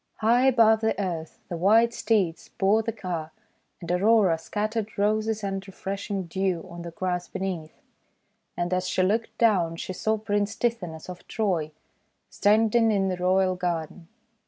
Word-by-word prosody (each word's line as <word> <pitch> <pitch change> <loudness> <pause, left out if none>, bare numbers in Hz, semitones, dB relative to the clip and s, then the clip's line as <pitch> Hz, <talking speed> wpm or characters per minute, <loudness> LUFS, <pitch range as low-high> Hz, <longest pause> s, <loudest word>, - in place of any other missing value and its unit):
High 240 +4 +3
above 225 -4 +5
the 220 -2 0
earth 170 -5 -4
the 175 - -4
white 225 +6 +4
steeds 210 -8 0
bore 205 +3 +2
the 225 +1 -2
car, 175 -7 -5 0.5
and 170 0 -5
Aurora 190 -2 +4
scattered 215 +5 -3
Roses 215 +1 0
and 195 -1 -3
refresh 195 +1 -6
ing 195 -2 -1
dew 180 0 -2
on 170 0 -8
the 170 - -6
grass 180 +1 -3
beneath. 175 -5 -5 0.7
And 175 +1 -1
as 185 0 0
she 185 - +1
looked 220 +3 0
down 185 -8 +3
she 185 - -5
saw 220 +4 0
Prince 205 0 -1
Tithonus 185 -10 -3
of 180 -1 -10
Troy 180 -8 -1 0.6
standing 225 +2 +3
in 195 -2 +1
the 185 - -2
royal 185 +1 +2
garden. 170 -1 -3
195 Hz, 160 wpm, -26 LUFS, 175-220 Hz, 0.7 s, above